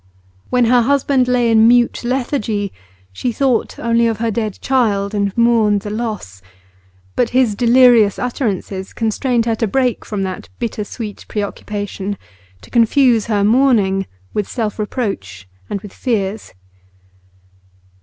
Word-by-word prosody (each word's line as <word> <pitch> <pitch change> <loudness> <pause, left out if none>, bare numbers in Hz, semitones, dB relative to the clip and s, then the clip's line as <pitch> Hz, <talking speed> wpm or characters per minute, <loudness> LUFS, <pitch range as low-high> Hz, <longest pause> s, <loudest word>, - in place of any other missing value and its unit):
When 250 -1 +3
her 245 +1 +4
husband 270 0 +2
lay 245 -2 +2
in 220 0 +6
mute 240 0 +3
lethargy, 240 -5 -2 0.4
she 245 - -2
thought 255 -1 0
only 235 0 +2
of 225 -2 -1
her 230 0 -1
dead 215 -2 -3
child, 215 -6 0
and 200 -1 0
mourned 225 -3 +3
the 205 - -6
loss; 210 - -5 0.7
but 240 - +1
his 250 -5 +3
delirious 240 -2 +5
utterances 200 -6 -3
constrained 230 +1 0
her 230 - +1
to 225 - 0
break 250 +2 0
from 205 -3 -3
that 185 -1 -5
bittersweet 215 -1 -5
preoccupation, 205 -1 -4 0.5
to - - -16
confuse 235 -1 +3
her 205 -3 +1
mourning 210 -5 +3 0.3
with 210 -2 -2
self 220 -3 -3
reproach 195 - -4 0.2
and 200 - -3
with 205 -2 -11
fears. 210 - -3
225 Hz, 135 wpm, -17 LUFS, 205-245 Hz, 0.7 s, in